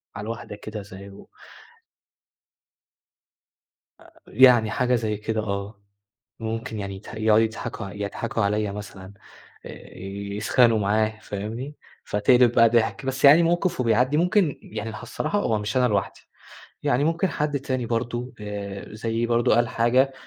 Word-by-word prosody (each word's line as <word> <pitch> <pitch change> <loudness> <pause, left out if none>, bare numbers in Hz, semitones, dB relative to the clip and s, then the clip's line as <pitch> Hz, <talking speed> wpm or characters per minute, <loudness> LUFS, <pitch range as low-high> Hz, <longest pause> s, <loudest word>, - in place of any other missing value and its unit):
على 105 - -6
الواحدة 115 -2 -6
كده 105 +1 -7
زيه. 100 0 -12 2.7
آآ، - - -21
يعني 120 -3 +5
حاجة 125 0 +1
زي 110 -3 -1
كده، 110 +1 -2
آه. 100 0 -5 0.6
ممكن 115 0 -4
يعني 100 -1 -5
يت 95 - -12
يقعدوا 110 0 +2
يضحكوا 110 0 -6
ع 95 - -8
يضحكوا 105 +2 -3
عليَّ 105 0 0
مثلًا، 100 -1 -9 0.5
آآ - - -11 0.4
يسخَنوا 115 +2 +3
معاه، 110 +2 0
فاهمني؟ 115 +8 -6 0.3
فتقلب 120 +4 +3
بقى 115 -1 +5
ضحك. 115 +3 +1
بس 135 +1 0
يعني 150 +5 +8
موقف 175 0 0
وبيعدي، 125 +5 +2
ممكن 180 -2 +2
يعني 110 0 -7
الصراحة 165 +7 -2
هو 110 - 0
مش 105 +4 -2
أنا 125 -1 +4
لوحدي، 100 -4 -2 0.6
يعني 130 +4 +1
ممكن 165 +4 +1
حد 150 -3 -1
تاني 130 -3 -2
برضه، 120 +2 -3
آآ 100 -1 -6
زيي 115 +2 -2
برضه 120 0 +2
قال 120 -1 +2
حاجة، 125 +4 +2
115 Hz, 140 wpm, -24 LUFS, 105-125 Hz, 2.7 s, يعني